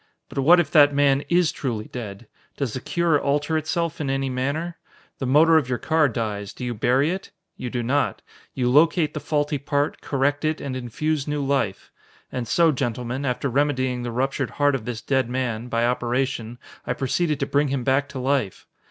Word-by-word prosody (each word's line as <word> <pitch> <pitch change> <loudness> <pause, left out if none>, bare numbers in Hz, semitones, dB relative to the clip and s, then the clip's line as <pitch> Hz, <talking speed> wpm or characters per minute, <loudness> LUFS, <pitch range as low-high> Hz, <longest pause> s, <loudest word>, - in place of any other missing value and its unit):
But - - -4
what 170 +6 +7
if 160 -4 0
that 145 -3 +6
man 140 -1 +3
is 175 -2 +3
truly 115 -8 -3
dead? 110 -2 -8 0.3
Does 135 -6 -2
the - - -3
cure 165 +2 +1
alter 145 +3 0
itself 160 +1 -1
in 140 - -2
any 135 0 -1
manner? 145 +7 -2 0.4
The 130 - -2
motor 160 +5 +6
of 140 -5 0
your 125 - 0
car 160 0 +2
dies 105 -4 -3
do 125 - -6
you 120 - -2
bury 130 +7 +2
it? 190 +1 -5 0.3
You 125 - -5
do 120 0 -2
not; 140 +5 0 0.3
you 125 -2 0
locate 155 +4 +4
the 150 - -3
faulty 145 -1 -1
part, 145 +2 -1
correct 145 +2 0
it, 155 0 0
and 135 -2 -4
infuse 140 +4 -2
new 145 -1 -1
life. 135 -9 -1 0.4
And 125 -2 -3
so, 165 +6 +4
gentlemen, 125 +1 -3
after 125 +1 -1
remedying 130 -2 0
the 120 - -3
ruptured 135 +2 -1
heart 145 0 +2
of 130 -5 -3
this 120 -2 -4
dead 130 -3 +1
man, 125 -2 -2
by 115 -1 +1
operation, 120 -1 -1 0.3
I - - -1
proceeded 150 +3 0
to 140 - 0
bring 145 +1 +1
him 135 -2 -2
back 135 +2 +1
to 140 - -7
life. 130 -6 -1
135 Hz, 195 wpm, -23 LUFS, 125-150 Hz, 0.4 s, what